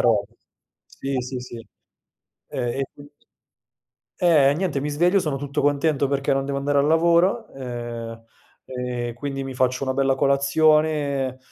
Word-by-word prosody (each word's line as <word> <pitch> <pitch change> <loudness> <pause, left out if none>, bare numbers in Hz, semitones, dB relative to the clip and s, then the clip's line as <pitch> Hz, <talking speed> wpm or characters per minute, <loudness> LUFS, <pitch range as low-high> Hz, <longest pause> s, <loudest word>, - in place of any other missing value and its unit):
rob - - +3 0.6
sì, 135 -1 -4
sì, 125 +1 -5
sì. 120 -2 -9 0.8
Ehm, 125 -2 -3
e - - +1
quindi 145 0 -14 1.0
eh, 150 -6 +4
niente, 170 -4 -1
mi 145 +2 -3
sveglio, 175 +6 +3
sono 155 -6 -2
tutto 140 +2 -3
contento 145 0 +2
perché 140 0 0
non 135 0 +1
devo 140 0 -2
andare 140 +1 0
al 140 - +3
lavoro, 170 +3 +3
ehm, 120 -3 -6 0.4
e 125 -2 -4
quindi 135 +2 -4
mi 135 -1 -6
faccio 130 +1 0
una 130 -1 -1
bella 135 0 +2
colazione, 140 -1 +2
140 Hz, 145 wpm, -23 LUFS, 130-150 Hz, 1.0 s, eh